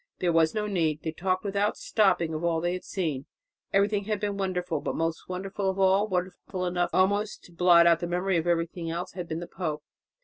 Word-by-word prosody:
There 175 Hz, -2 st, +1 dB
was 165 Hz, +3 st, +3 dB
no 210 Hz, -1 st, 0 dB
need, 165 Hz, -7 st, 0 dB
they 160 Hz, -, -2 dB
talked 185 Hz, +3 st, -1 dB
without 200 Hz, +1 st, 0 dB
stopping 180 Hz, -6 st, +2 dB
of 155 Hz, +2 st, -4 dB
all 170 Hz, -1 st, +1 dB
they 175 Hz, +2 st, -1 dB
had 185 Hz, -, -5 dB
seen. 155 Hz, -8 st, -3 dB, 0.4 s
Everything 200 Hz, +1 st, +2 dB
had 215 Hz, -1 st, -1 dB
been 205 Hz, -1 st, -2 dB
wonderful, 180 Hz, -5 st, -2 dB
but -, -, -3 dB
most 165 Hz, +1 st, -2 dB
wonderful 190 Hz, +2 st, -2 dB
of 190 Hz, -, -2 dB
all 195 Hz, +2 st, +4 dB
wonderful 185 Hz, 0 st, -3 dB
enough 175 Hz, 0 st, 0 dB
almost 200 Hz, +3 st, +1 dB
to -, -, -16 dB
blot 170 Hz, 0 st, +6 dB
out 170 Hz, -1 st, +5 dB
the 175 Hz, -, -3 dB
memory 180 Hz, +1 st, 0 dB
of 165 Hz, +1 st, -1 dB
everything 170 Hz, 0 st, -1 dB
else 170 Hz, +2 st, -4 dB
had 175 Hz, -1 st, -5 dB
been 160 Hz, +1 st, -4 dB
the -, -, -5 dB
pope. 155 Hz, -5 st, -4 dB
180 Hz, 215 wpm, -27 LUFS, 165-195 Hz, 0.4 s, blot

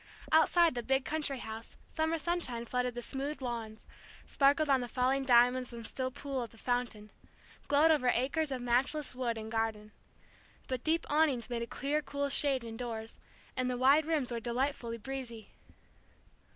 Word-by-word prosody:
Outside 330 Hz, +1 st, +5 dB
the 240 Hz, -, -2 dB
big 265 Hz, +2 st, +1 dB
country 300 Hz, -3 st, -2 dB
house 220 Hz, -1 st, -8 dB
summer 320 Hz, +1 st, -1 dB
sunshine 310 Hz, -8 st, -1 dB
flooded 250 Hz, 0 st, -1 dB
the 240 Hz, -, -5 dB
smooth 280 Hz, +4 st, -4 dB
lawns, 230 Hz, -4 st, -5 dB, 0.4 s
sparkled 280 Hz, +2 st, +3 dB
on 270 Hz, -2 st, +3 dB
the 245 Hz, -, -4 dB
falling 260 Hz, +2 st, +1 dB
diamonds 250 Hz, 0 st, +4 dB
and 230 Hz, -1 st, -8 dB
still 260 Hz, +3 st, -1 dB
pool 275 Hz, 0 st, -4 dB
of 235 Hz, -, -5 dB
the 225 Hz, -, -18 dB
fountain, 240 Hz, -4 st, -2 dB, 0.6 s
glowed 295 Hz, +3 st, +5 dB
over 265 Hz, -5 st, +3 dB
acres 280 Hz, +6 st, 0 dB
of 260 Hz, -2 st, -3 dB
matchless 255 Hz, +4 st, +1 dB
wood 245 Hz, -2 st, -2 dB
and 220 Hz, 0 st, -6 dB
garden. 220 Hz, -2 st, -2 dB, 0.8 s
But 255 Hz, -1 st, -3 dB
deep 330 Hz, +1 st, +1 dB
awnings 290 Hz, -6 st, +1 dB
made 235 Hz, -1 st, -1 dB
a 235 Hz, -, -3 dB
clear 285 Hz, +5 st, -1 dB
cool 285 Hz, -1 st, -3 dB
shade 275 Hz, -2 st, +2 dB
indoors, 225 Hz, -1 st, -6 dB, 0.4 s
and 255 Hz, 0 st, 0 dB
the 250 Hz, -, -1 dB
wide 280 Hz, +5 st, +5 dB
rooms 300 Hz, -6 st, 0 dB
were 235 Hz, -, -2 dB
delightfully 240 Hz, 0 st, -2 dB
breezy. 235 Hz, -2 st, -7 dB
255 Hz, 165 wpm, -32 LUFS, 235-285 Hz, 0.8 s, Outside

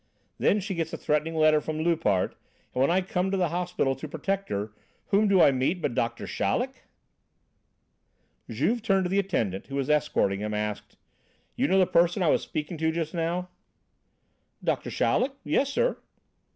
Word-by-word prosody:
Then 210 Hz, -, +3 dB
she 200 Hz, 0 st, -4 dB
gets 165 Hz, -2 st, -2 dB
a -, -, -3 dB
threatening 150 Hz, +2 st, 0 dB
letter 155 Hz, -1 st, +4 dB
from 155 Hz, 0 st, -4 dB
Loupart. 160 Hz, -, +1 dB, 0.4 s
And 125 Hz, -, 0 dB
when 135 Hz, -, +4 dB
I 180 Hz, +2 st, +3 dB
come 180 Hz, 0 st, -1 dB
to 195 Hz, -, 0 dB
the 180 Hz, -3 st, +1 dB
hospital 175 Hz, -5 st, 0 dB
to 155 Hz, -, -6 dB
protect 195 Hz, +6 st, -3 dB
her, 105 Hz, +1 st, -3 dB, 0.4 s
whom 210 Hz, +1 st, +3 dB
do 195 Hz, -2 st, +4 dB
I 145 Hz, -, +7 dB
meet 135 Hz, +7 st, 0 dB
but 140 Hz, -, -1 dB
Doctor 115 Hz, 0 st, -2 dB
Chaleck!" 260 Hz, +1 st, -2 dB, 1.6 s
Juve, 235 Hz, +1 st, 0 dB
turning 195 Hz, -3 st, +2 dB
to 180 Hz, -, -1 dB
the 195 Hz, -, +3 dB
attendant 110 Hz, -, -1 dB
who 135 Hz, -, -6 dB
was 140 Hz, +1 st, 0 dB
escorting 145 Hz, -10 st, +1 dB
him, 105 Hz, 0 st, -3 dB
asked: 105 Hz, -1 st, -4 dB, 0.6 s
"You -, -, +1 dB
know 190 Hz, -, +3 dB
the 185 Hz, -, +5 dB
person 175 Hz, +2 st, +2 dB
I 165 Hz, -, +3 dB
was -, -, +3 dB
speaking 155 Hz, +2 st, -5 dB
to 160 Hz, 0 st, +1 dB
just 160 Hz, -1 st, -3 dB
now?" 175 Hz, +2 st, -2 dB, 1.1 s
"Doctor -, -, -1 dB
Chaleck? 265 Hz, +2 st, +1 dB
Yes, 275 Hz, -, +1 dB
sir." -, -, 0 dB
165 Hz, 180 wpm, -27 LUFS, 140-190 Hz, 1.6 s, I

